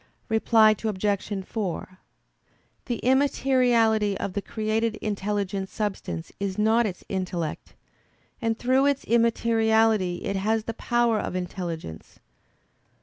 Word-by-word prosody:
Reply 220 -1 +5
Obj. 205 -1 -1
4: 185 -3 -4 0.9
The 240 -3 -1
immateriality 245 -6 +3
of 195 - -4
the 200 - -2
created 220 +1 -1
intelligent 200 -2 -2
substance 190 - -4
is 195 -1 -3
not 220 +2 +3
its 180 -3 -7
intellect; 180 -4 -4 0.7
and 225 -1 0
through 260 +3 +2
its 280 -1 +1
immateriality 225 -4 +2
it 200 - -1
has 215 +3 0
the 230 - -4
power 240 -1 +1
of - - -4
intelligence. 170 - -6
215 Hz, 110 wpm, -25 LUFS, 190-230 Hz, 0.9 s, Reply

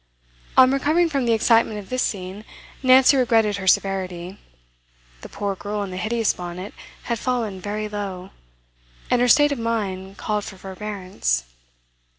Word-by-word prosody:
On 260 0 +8
recovering 310 +5 +2
from 275 -5 -1
the - - +3
excitement 225 -1 +3
of 200 -2 -9
this 255 0 0
scene, 190 +1 -3 0.4
Nancy 260 +1 +6
regretted 225 -5 +2
her 190 -1 -6
severity; 185 -1 0 0.8
the - - -10
poor 200 -1 -3
girl 205 +2 -4
in 195 - -6
the 185 - -6
hideous 225 +3 0
bonnet 180 +3 -7 0.3
had 235 -2 -2
fallen 230 -7 -2
very 210 +2 -3
low, 195 -3 -6 0.8
and 245 - +3
her 245 - +4
state 290 +3 +5
of 280 - -2
mind 200 -4 -3
called 210 -1 -2
for 195 - -9
forbearance. 185 - -3
210 Hz, 155 wpm, -22 LUFS, 190-235 Hz, 0.8 s, On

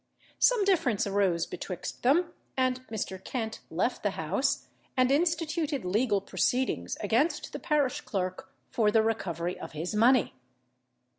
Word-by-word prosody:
Some 485 -5 +4
difference 330 - +2
arose 195 -4 +1
betwixt 180 -3 -6
them, 335 +7 +3 0.2
and 255 -1 +1
Mr. 190 -4 -5
Kent 225 -3 -4
left - - -1
the - - +1
house, - - 0 0.3
and 255 0 +4
instituted 320 - 0
legal 205 +2 +2
proceedings 220 - 0
against 235 +10 +1
the - - -4
parish 290 -4 +1
clerk 185 -2 -4 0.2
for 220 -3 +3
the 220 +1 +4
recovery 180 -6 -2
of - - -8
his 160 +5 -4
money. 235 0 +4
225 Hz, 135 wpm, -29 LUFS, 195-280 Hz, 0.3 s, Some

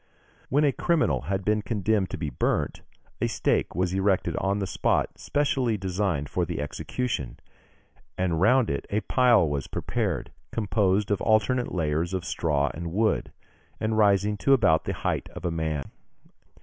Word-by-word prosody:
When 145 +3 +3
a 145 - +4
criminal 155 - +1
had 95 -1 -1
been 105 0 +2
condemned 105 -3 0
to - - -5
be 75 -4 -3
burnt, - - -1 0.4
a - - +2
stake - - 0
was 90 +1 0
erected 95 -3 +1
on 100 +1 0
the 100 - -1
spot 95 - 0
specially 135 -6 0
designed 95 -5 -1
for - - -1
the - - -3
execution, 75 - -3 0.8
and 90 -3 0
round 125 +3 +4
it 70 - -3
a 105 +2 0
pile 120 -8 +4
was 70 -2 -2
prepared, - - -2 0.2
composed 105 -2 +1
of 100 - +1
alternate 115 +3 +2
layers 85 +1 -1
of 90 -2 -3
straw 75 -5 0
and 85 +1 -5
wood, 110 +4 +1 0.5
and 110 0 0
rising 105 -1 +3
to 135 - +3
about 95 -12 +3
the - - -2
height - - -2
of - - -7
a 85 - 0
man. 80 -4 -3
95 Hz, 160 wpm, -26 LUFS, 85-110 Hz, 0.8 s, a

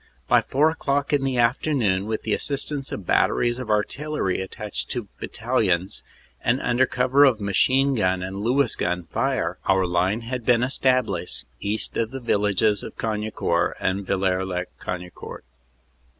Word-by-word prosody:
By - - +5
four 150 +4 +2
o - - -4
clock 140 -2 -1
in 140 -2 +2
the 135 -2 0
afternoon, 115 -5 +1
with 110 -1 -2
the 110 - 0
assist 140 +1 -1
ance 140 -2 -3
of 100 - -5
batteries 120 +6 +2
of 125 -4 -6
artillery 105 -1 -1
attached 105 +2 -5
to 120 -5 -3
battalions, 105 -7 -1 0.4
and 125 +3 +2
under 125 +1 +2
cover 130 +3 +3
of 130 -6 +4
machine 130 +8 +2
gun 95 -5 +1
and 95 +1 -5
Lewis 120 +4 +1
gun 90 0 -1
fire, - - -1
our 95 -1 +3
line 90 +5 +1
had 120 +1 -4
been 120 0 +3
established 125 - 0
east 105 +2 -2
of 115 -1 0
the 135 +2 -6
villages 105 -2 +1
of - - -9
Cagnicourt 105 -6 -1
and 95 +1 -1
Villers 95 -1 0
lez 90 -1 -2 0.2
Cagnicourt. 90 -1 -7
110 Hz, 160 wpm, -24 LUFS, 95-130 Hz, 0.4 s, By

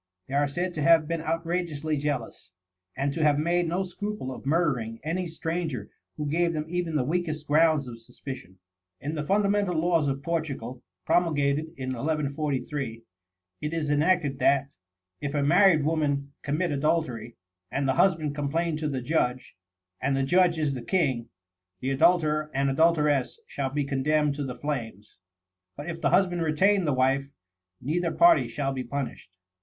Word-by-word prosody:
They 135 - -9
are 145 +1 +3
said 175 +6 -2
to 155 - -4
have 160 0 +5
been 165 0 -2
outrageously 165 -2 -2
jealous, 140 -8 -3 0.5
and 140 0 0
to 160 - -2
have 150 -2 +4
made 170 +3 +1
no 175 +4 0
scruple 205 -6 -5
of 130 - -9
murdering 135 -8 0
any 175 +4 -2
stranger 165 -3 -3 0.3
who 150 - -3
gave 170 +3 +1
them 155 -1 -2
even 175 -1 -2
the 140 - +2
weakest 155 0 -2
grounds 155 -1 +3
of 115 -1 -8
suspicion. 120 -5 -9 0.4
In 150 +3 -4
the 150 -2 -2
fundamental 200 +1 +1
laws 165 -2 +2
of 140 0 -2
Portugal, 140 -7 -3 0.2
promulgated 150 -3 +2
in 130 -1 -4
1143, 140 -3 -2 0.6
it 150 +2 -3
is 155 -3 -1
enacted 150 -2 +2
that, 140 0 +2 0.5
"if 145 0 -3
a 145 - +1
married 170 0 +5
woman 145 -3 0
commit 155 +4 -1
adultery, 140 -6 -1 0.4
and 140 -1 0
the 130 - +3
husband 165 -4 +2
complain 155 +3 -1
to 155 -1 -2
the 130 -3 -3
judge, 130 -3 -1 0.5
and 135 0 +1
the 135 - +1
judge 175 +3 +3
is 150 -3 0
the 130 - -5
king, 130 -8 0 0.5
the 130 +5 -2
adulterer 155 +1 +3
and 140 0 +2
adulteress 150 - +2
shall 140 - -3
be 145 +2 -1
condemned 145 +2 +1
to 145 +1 -4
the 130 -2 -5
flames; 115 -10 -5 0.6
but 145 +3 -7
if 165 -1 -5
the - - +2
husband 180 0 +2
retain 185 +5 +3
the 150 - +2
wife, 135 +2 +1 0.5
neither 165 +5 -1
party 340 -1 +5
shall 135 -2 -2
be 130 -1 -3
punished." 135 -5 -5
150 Hz, 165 wpm, -27 LUFS, 140-165 Hz, 0.6 s, have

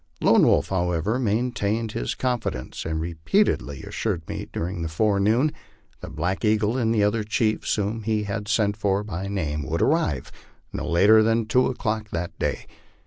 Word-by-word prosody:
Lone - - +5
Wolf, - - +3
however, 90 +5 0
maintained 115 -1 0
his - - -3
confidence, 125 -3 -3
and 80 0 -2
repeatedly 80 - 0
as - - -9
sured 90 -8 -2
me - - -5
during 90 +1 -3
the 80 - -2
forenoon 105 - +2 0.5
that - - -9
Black 90 +7 -2
Eagle 105 +1 +2
and 115 -3 +1
the 110 -3 +2
other 105 +1 +1
chiefs, 110 +1 0
whom 105 +2 -2
he 110 0 0
had 105 +1 -4
sent 105 -2 +1
for 100 -1 0
by 100 -2 -5
name, 80 -7 -2
would 80 +5 -2
arrive 135 - 0 0.4
not - - -4
later 100 +6 +6
than 115 +1 +2
two 125 +3 +3
o'clock 110 -4 -2
that 85 -1 -3
day. - - -2
105 Hz, 170 wpm, -24 LUFS, 90-115 Hz, 0.5 s, later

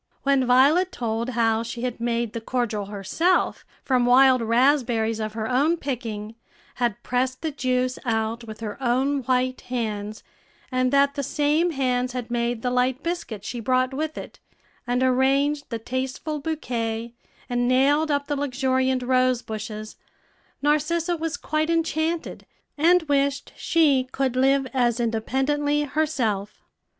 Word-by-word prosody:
When 275 -2 +2
Violet 285 +9 +4
told 230 0 -2
how 225 -1 +2
she 235 +1 -6
had 250 -2 -3
made 235 -1 -1
the 230 - -4
cordial 225 -4 -2
herself 210 - 0 0.2
from 250 -2 +2
wild 255 0 +6
raspberries 230 -2 +2
of 215 -1 -3
her 220 0 -3
own 285 +8 +2
picking, 225 -7 -5 0.4
had 240 -4 -1
pressed 255 +2 -1
the 320 - -1
juice 255 -2 -1
out 225 0 -1
with 220 0 -9
her 215 +3 -6
own 265 +3 +1
white 255 0 0
hands, 215 -4 -4 0.5
and 255 0 +1
that 280 0 +4
the 280 - -3
same 300 +5 +1
hands 255 -4 0
had 245 -2 -5
made 235 -1 -1
the 250 - 0
light 250 +1 +1
biscuit 335 - -4
she 245 - -4
brought 255 +3 +1
with 310 +3 -3
it, - - -8 0.5
and 245 +1 +1
arranged 275 +3 +2
the 230 - -2
tasteful 260 +6 -4
bouquet, 235 -7 -3 0.3
and 245 0 0
nailed 280 +5 +3
up 285 -1 0
the 290 - -2
luxuriant 260 -2 0
rosebushes, 225 -4 -1 0.7
Narcissa 325 +4 +1
was 325 -1 -3
quite 310 +1 -1
enchanted, 330 0 -1 0.3
and 340 +4 +4
wished 280 -2 0
she 290 -6 +2
could 265 -2 -1
live 270 +1 +3
as 240 -2 +1
independently 270 +6 0
herself. 255 -9 -2
255 Hz, 140 wpm, -24 LUFS, 235-285 Hz, 0.7 s, wild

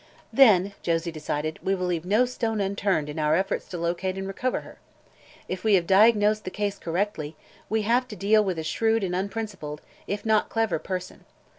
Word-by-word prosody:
"Then," 200 -7 +6
Josie 170 0 -1
decided, 155 0 -3
"we 195 - +1
will 185 -1 -2
leave 175 -2 -2
no 215 +7 +3
stone 230 -3 -2
unturned 195 -5 0
in 150 +2 -5
our 150 0 +3
efforts 190 +3 -1
to 180 - -6
locate 175 +3 -2
and 195 - -4
recover 250 +6 -2
her. - - -14 0.7
If 185 - -5
we 215 -2 +5
have 175 -3 +2
diagnosed 210 +2 +4
the - - -4
case 205 0 -3
correctly, 165 -3 -2 0.3
we 220 0 +1
have 245 +4 +2
to 215 - -8
deal 210 +3 +3
with 185 -4 -2
a 160 - -3
shrewd 225 +7 +1
and 180 -2 -1
unprincipled, 195 -6 -4 0.3
if 205 +2 -3
not 220 -1 +2
clever 225 -7 0
person. 185 +1 -6
195 Hz, 190 wpm, -26 LUFS, 170-215 Hz, 0.7 s, Then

